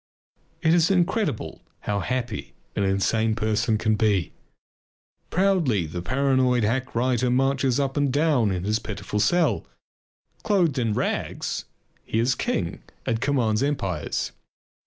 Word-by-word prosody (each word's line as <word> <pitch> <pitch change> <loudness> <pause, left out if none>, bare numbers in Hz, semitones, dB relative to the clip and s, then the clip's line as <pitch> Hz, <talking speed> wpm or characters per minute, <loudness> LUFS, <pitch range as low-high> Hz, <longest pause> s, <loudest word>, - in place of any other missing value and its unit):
It 160 -1 +4
is 170 0 +4
incredible 175 - 0 0.2
how 105 -1 -1
happy 120 -1 -3 0.2
an - - 0
insane 110 +3 +1
person 110 0 +1
can 110 0 +1
be. 105 -5 +1 1.0
Proudly 170 - +2
the 85 +3 -5
paranoid 130 +1 +2
hack 125 +5 -1
writer 125 +1 +1
marches 135 0 +2
up 135 -1 -1
and 145 -2 +2
down 145 -6 +2
in 90 -2 -2
his 105 +3 +1
pitiful 105 -1 -4
cell. 175 +9 +2 0.8
Clothed 180 - +2
in 115 -3 0
rags, - - -2 0.4
he - - -3
is 120 +3 +3
king 85 -7 -2 0.2
and 115 0 -1
commands 125 -5 +1
empires. 100 - -1
125 Hz, 130 wpm, -25 LUFS, 105-140 Hz, 1.0 s, It